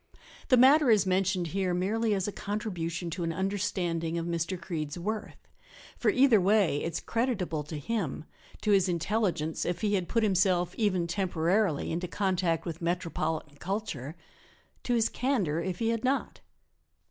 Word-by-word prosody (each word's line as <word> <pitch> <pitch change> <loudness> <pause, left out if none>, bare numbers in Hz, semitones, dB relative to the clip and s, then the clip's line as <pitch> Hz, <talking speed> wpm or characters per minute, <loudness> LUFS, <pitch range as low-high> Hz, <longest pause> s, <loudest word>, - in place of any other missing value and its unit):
The 255 - +5
matter 270 +3 +6
is 210 -4 +5
mentioned 185 -2 +1
here 185 0 0
merely 210 +4 +1
as 190 0 -1
a - - -2
contribution 180 -6 -4
to 175 +2 -3
an 165 - -1
understanding 180 -3 -1
of 165 - -2
Mr. 170 +2 -2
Creede's 160 -4 -4
worth, 215 +5 -5 0.5
for - - +1
either 255 -6 +5
way 190 -6 +3
it 165 - -2
is - - -1
creditable 220 - -1
to 155 +1 -6
him 160 -3 -3 0.4
to 210 - +1
his 195 -2 +4
intelligence 170 -2 -1
if 175 0 -2
he 210 -1 +1
had 185 -3 0
put 230 -2 +1
himself, 185 -3 +2
even 185 -6 +1
temporarily, 175 -1 0
into 175 +2 -2
contact 180 -3 0
with 165 -1 -5
metropolitan 160 -3 -2
culture; 175 - -4 0.7
to 245 - 0
his 230 -1 +3
candor 205 - 0
if 180 0 -3
he 225 +2 0
had 230 0 -1
not. 265 +2 -1
185 Hz, 160 wpm, -29 LUFS, 170-210 Hz, 0.7 s, matter